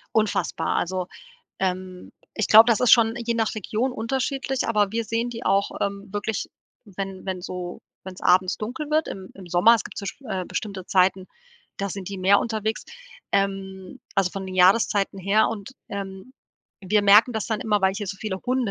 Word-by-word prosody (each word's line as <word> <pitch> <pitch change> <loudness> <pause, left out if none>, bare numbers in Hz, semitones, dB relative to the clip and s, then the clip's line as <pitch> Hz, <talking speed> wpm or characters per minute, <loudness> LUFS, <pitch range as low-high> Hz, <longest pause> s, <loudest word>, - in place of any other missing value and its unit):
Unfassbar. 195 -6 0
Also, 185 +1 -2 0.5
ähm, 185 -1 -4 0.2
ich 220 - 0
glaube, 220 +1 +8
das 225 - +2
ist 250 - +5
schon 225 -1 +5
je 235 0 -2
nach 225 -1 0
Region 220 +4 -2
unterschiedlich, 265 +3 -2
aber 210 -3 +2
wir 230 0 -1
sehen 230 +2 -1
die 235 0 -7
auch, 195 +1 +2
ähm, 200 0 -3
wirklich, 205 +1 -3 0.4
wenn 195 -2 -7
wenn 185 -1 -3
so 180 0 -6 0.2
wenn's 185 0 -9
abends 185 0 +3
dunkel 260 +8 -5
wird, 310 +1 +1
im 190 -1 -8
im 190 -2 -12
Sommer. 180 +7 +6
Es 225 - -1
gibt - - -9
so, 200 - -5
sch 195 - -6
äh, 185 -3 -2
bestimmte 190 0 -5
Zeiten, 185 0 +2 0.5
da 200 - -2
sind 195 -1 -6
die 200 - -5
mehr 195 +2 +5
unterwegs, 220 -1 -2 0.5
ähm, 195 +1 -2 0.2
also, 195 -2 +2
von 195 0 -6
den 185 - -7
Jahreszeiten 195 +2 +3
her 200 +3 +3
und, 205 -1 -6 0.2
ähm, 195 +3 -7 0.5
wir 210 +3 +3
merken 210 +5 +6
das 220 -3 -3
dann 220 -2 -2
immer, 210 -2 +1
weil 190 0 +2
hier 205 0 -4
so 195 - -5
viele 195 -3 -4
Hunde 255 -3 0
200 Hz, 190 wpm, -24 LUFS, 190-225 Hz, 0.5 s, glaube